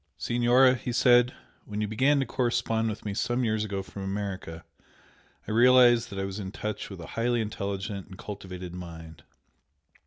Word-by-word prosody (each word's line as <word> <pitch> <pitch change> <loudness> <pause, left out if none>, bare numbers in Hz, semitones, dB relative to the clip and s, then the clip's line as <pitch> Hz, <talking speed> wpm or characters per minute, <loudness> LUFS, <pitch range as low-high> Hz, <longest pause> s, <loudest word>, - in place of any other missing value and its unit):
"Signora," 120 +2 +4
he 125 -1 -4
said 125 0 +5 0.3
"When 105 0 -5
you 105 - 0
began 135 +7 +2
to - - 0
correspond 115 -3 0
with 110 0 -6
me 105 - -2
some 120 +4 0
years 110 -2 0
ago 100 -2 -3
from 100 - -9
America, 95 -4 -5 0.8
I - - -3
realised 120 0 +6
that 100 - -8
I 95 - -1
was 95 +1 -5
in 95 -2 -5
touch 105 0 -5
with 95 -3 -9
a - - -7
highly 120 +1 +1
intelligent 100 -2 -4
and 95 -2 -12
cultivated 90 -4 -8
mind. 80 -3 -9
105 Hz, 175 wpm, -27 LUFS, 95-120 Hz, 0.8 s, realised